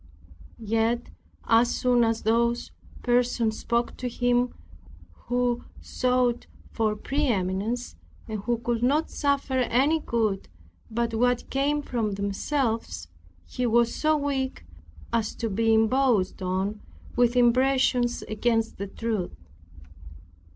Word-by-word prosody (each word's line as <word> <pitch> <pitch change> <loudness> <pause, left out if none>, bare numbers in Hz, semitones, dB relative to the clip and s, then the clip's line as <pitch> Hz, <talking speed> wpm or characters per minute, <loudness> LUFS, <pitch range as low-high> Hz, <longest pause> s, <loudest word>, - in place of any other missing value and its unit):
Yet 225 +2 0 0.3
as 230 +1 +4
soon 245 -2 +3
as 225 0 0
those 235 +2 +1 0.3
persons 240 -2 +1
spoke 235 0 -1
to 250 - -3
him, 245 +1 +1 0.8
who 245 0 0 0.2
sought 250 -1 0 0.2
for 215 -2 0
pre 280 +7 -1
eminence, 205 +3 -1 0.3
and 215 -2 -4
who 235 +4 -1
could 235 0 -2
not 285 +6 +2
suffer 280 -2 0
any 270 +6 +2
good 220 -8 -1 0.4
but 230 +1 -1
what 245 +2 +1
came 290 +2 +1
from 225 -6 -2
themselves, 200 - -2 0.4
he 250 -1 -2
was 235 0 +3
so 310 0 +2
weak 270 - -2 0.5
as 225 -2 0
to 225 -2 -3
be 225 +3 +2
imposed 225 -3 +2
on 190 +3 -2 0.3
with 245 0 +3
impressions 250 0 +3
against 225 0 -1
the 200 - -3
truth. 215 -3 -3
235 Hz, 115 wpm, -26 LUFS, 220-250 Hz, 0.8 s, as